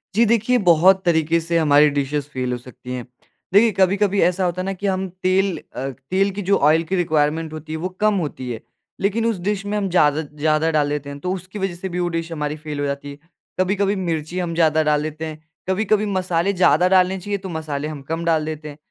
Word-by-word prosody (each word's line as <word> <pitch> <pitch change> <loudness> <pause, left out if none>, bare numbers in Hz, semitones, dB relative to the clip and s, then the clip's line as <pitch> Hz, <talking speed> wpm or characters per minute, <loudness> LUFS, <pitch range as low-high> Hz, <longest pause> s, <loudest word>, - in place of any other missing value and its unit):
जी, 235 - +5
देखिए 230 +2 +2
बहुत 185 0 +4
तरीक़े 165 0 +2
से 170 +1 -1
हमारी 150 -1 +5
डिशेज़ 145 0 -1
फेल 130 -1 -2
हो 125 - -1
सकती 125 0 -11
हैं। 125 -2 -5 0.5
देखिए 220 +2 +6
कभी-कभी 200 +1 +3
ऐसा 180 +1 +2
होता 180 +1 -1
है - - -4
ना 195 - -2
कि 200 +2 -4
हम 190 0 -1 0.2
तेल 190 0 +2 0.2
अ, 135 - -3
तेल 185 +10 -1
की 205 +2 -5
जो 200 +1 +2
ऑयल 155 +3 +4
की 190 +4 -2
रिक्वायरमेंट 160 -1 0
होती 155 0 -8
है - - -2
वो 185 +2 -3
कम 215 -1 +3
होती 130 -5 -5
है, 110 - -5 0.4
लेकिन 210 +3 +1
उस 230 -4 +1
डिश 200 +2 -2
में 210 +1 -2
हम 195 -2 -1
ज़्यादा 155 -3 +3
ज़्यादा 155 +2 0
डाल 150 -2 +1
देते 145 -1 -3
हैं 140 0 -8
तो 180 +3 -3
उसकी 190 +2 -7
वजह 190 -2 -2
से 185 +2 -6
भी 180 +1 -3
वो 175 - 0
डिश 165 0 -5
हमारी 150 -1 -3
फेल 150 -1 -6
हो 145 - 0
जाती 140 0 -4
है। 140 - -11 0.4
कभी-कभी 200 +2 +1
मिर्ची 170 -1 -3
हम 175 -2 -2
ज़्यादा 160 -1 +3
डाल 150 -1 +1
देते 155 +1 -5
हैं, 155 -1 -7 0.3
कभी-कभी 210 +2 +1
मसाले 185 -1 0
ज़्यादा 180 -1 +4
डालने 190 0 +3
चाहिए 200 +2 -3
तो 190 -1 -8
मसाले 155 -3 -4
हम 150 -3 -7
कम 165 +1 -2
डाल 160 -2 +2
देते 155 -1 -6
हैं, 145 - -11
170 Hz, 235 wpm, -21 LUFS, 150-190 Hz, 0.5 s, देखिए